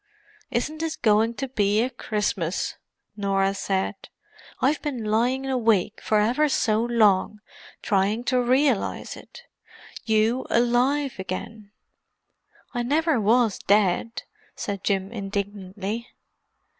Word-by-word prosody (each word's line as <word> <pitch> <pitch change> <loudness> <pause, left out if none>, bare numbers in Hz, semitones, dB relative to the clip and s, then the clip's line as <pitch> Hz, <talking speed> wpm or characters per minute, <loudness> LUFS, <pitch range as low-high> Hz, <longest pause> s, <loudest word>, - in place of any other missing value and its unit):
"Isn't 270 +5 -2
this 325 -1 -2
going 220 +1 +2
to 270 - -3
be 210 -4 +1
a 255 - -2
Christmas!" 210 -7 -2 0.4
Norah 195 -1 +1
said. 195 0 -3 0.5
"I've 285 +4 +1
been 270 -7 -3
lying 245 +5 +1
awake 225 -7 +1
for 215 - +2
ever 250 +8 +2
so 220 -4 +1
long, 215 -4 +2 0.4
trying 205 +2 +1
to 250 0 +1
realize 255 -2 +1
it. - - -13 0.6
You 220 +3 +1
alive 245 +3 +1
again——" 200 +3 -6 1.0
"I 245 - -1
never 300 +2 +1
was 225 0 +3
dead," 205 +3 +1 0.3
said 200 -2 -4
Jim 195 0 0
indignantly. 200 +1 -4
220 Hz, 110 wpm, -24 LUFS, 200-250 Hz, 1.0 s, was